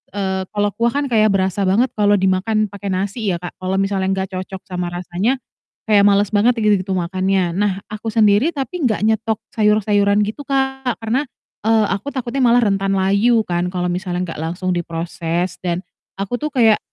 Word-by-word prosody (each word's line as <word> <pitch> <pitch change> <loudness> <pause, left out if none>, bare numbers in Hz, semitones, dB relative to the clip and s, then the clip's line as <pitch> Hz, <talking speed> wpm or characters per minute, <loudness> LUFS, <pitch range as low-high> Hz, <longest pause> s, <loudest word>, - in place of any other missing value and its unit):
eee, 190 -1 -1
kalau 205 0 +1
kuah 235 0 +1
kan 285 - +1
kayak 215 -2 +4
berasa 190 +1 0
banget 230 +7 +3
kalau 205 -1 +4
dimakan 195 +3 +1
pakai 200 0 -7
nasi 200 +4 -2
ya, - - 0
Kak, 175 - -8
kalau 185 +1 -2
misalnya 195 -1 0
nggak 190 0 -3
cocok 190 0 -7
sama 180 -1 -3
rasanya 180 +8 -1 0.5
kayak 205 -2 +5
males 200 0 +3
banget 225 +5 +5
gitu 205 -3 +1
makannya. 185 0 0
Nah 200 -1 0
aku 215 +1 -6
sendiri 215 +7 +4
tapi 295 +5 -4
nggak 215 -2 -1
nyetok 220 0 0 0.2
sayur-sayuran 210 -1 +3
gitu, 220 +8 -5
Kak, 265 -2 0
karena 255 +6 0 0.4
eee, 220 -1 +4
aku 200 +8 -2
takutnya 255 +1 -3
malah 240 0 +5
rentan 195 -1 +1
layu 200 +4 +3
kan 175 -1 -1
kalau 180 -1 -2
misalnya 180 0 -2
nggak 165 - -7
langsung 175 +3 -2
diproses 170 0 -3
dan 180 0 -2 0.3
aku 200 +5 -3
tuh 300 - -2
kayak, 225 -4 +5
200 Hz, 175 wpm, -19 LUFS, 185-220 Hz, 0.5 s, kayak